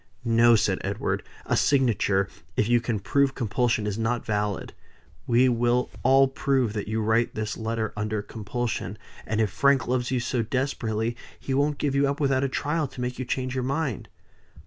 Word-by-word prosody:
"No!" 115 0 +5
said 105 - +1
Edward. - - -2 0.2
"A - - +1
signature, 110 -8 +2 0.3
if 105 - +2
you 120 0 +3
can 115 -3 -2
prove 135 +8 +1
compulsion, 115 -1 0
is 105 +1 -2
not 115 +1 -1
valid. 105 -3 -2 0.5
We 125 +2 +4
will 120 0 +1
all 135 +1 +5
prove 135 -4 0
that 105 -2 -4
you 110 +1 -1
write 110 +2 +1
this 110 -1 -3
letter 110 -1 -2
under 105 0 -2
compulsion; 110 -1 -4 0.3
and 110 - -1
if 110 -3 +1
Frank 140 +1 +3
loves 125 0 0
you 130 - 0
so 120 0 -1
desperately, 115 -2 -1 0.2
he 135 - -3
won't 145 +2 +1
give 145 -2 -1
you 140 0 +3
up 140 - -3
without 135 -2 +2
a 135 - 0
trial 150 +3 -1
to 130 - -12
make 125 0 -3
you 130 - -2
change 130 +1 -2
your 130 -1 -1
mind." 135 - -2
120 Hz, 185 wpm, -26 LUFS, 110-135 Hz, 0.5 s, No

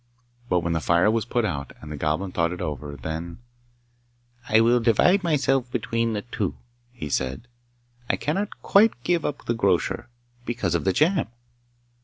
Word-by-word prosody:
But 90 -1 +2
when 85 0 -1
the 80 - +1
fire 85 +6 +3
was 110 -1 0
put 120 -1 0
out, 70 -9 -3
and 75 - -10
the - - -4
Goblin 80 +6 -1
thought 85 -1 +1
it 90 - -6
over 75 -1 -4
then 80 +5 -5 1.1
'I 110 +1 +5
will 120 +2 +4
divide 125 - +4
myself 135 -6 +1
between 115 -1 -1
the 105 - -3
two,' 115 -5 -3 0.4
he 120 -11 -7
said. 65 - -2 0.6
'I - - +3
cannot 195 +8 -3
quite 200 - +4
give 175 -3 +1
up 145 - -4
the 120 - +1
grocer, 100 -2 0 0.3
because 115 -8 -2
of 85 - 0
the 95 - +3
jam! 170 - +2
110 Hz, 170 wpm, -25 LUFS, 85-125 Hz, 1.1 s, I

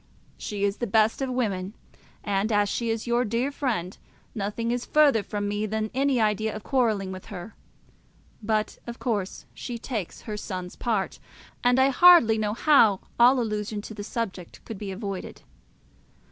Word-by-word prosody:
She 205 -1 -4
is 200 0 +1
the 240 - -2
best 220 +4 +2
of 265 - -1
women; 205 -6 -2 0.5
and, 205 +2 0
as 205 -1 +3
she 235 +2 -2
is 225 0 -2
your 240 +1 +2
dear 235 +4 -1
friend, 220 -11 -2 0.4
nothing 220 +2 -2
is 245 0 -1
further 290 -7 +4
from 205 0 -3
me 205 +1 -1
than 220 0 -2
any 270 -1 +2
idea 215 0 +1
of 215 - -7
quarrelling 220 -8 +1
with 185 0 -8
her; 200 0 -8 0.9
but 215 0 -1
of 235 0 -6
course 205 -6 -3
she 240 - -6
takes 225 -6 -5
her 210 -1 -5
son's 185 -3 -6
part, 215 -5 -2 0.4
and 245 +1 +4
I 265 +1 +5
hardly 275 -7 +7
know 210 0 -1
how 230 -10 +5 0.2
all 250 +2 +6
allusion 210 -2 -2
to 220 - -8
the 205 -1 -7
subject 200 -6 -5
could 220 -4 -7
be 205 - -5
avoided. 195 -1 -6
220 Hz, 170 wpm, -26 LUFS, 205-240 Hz, 0.9 s, hardly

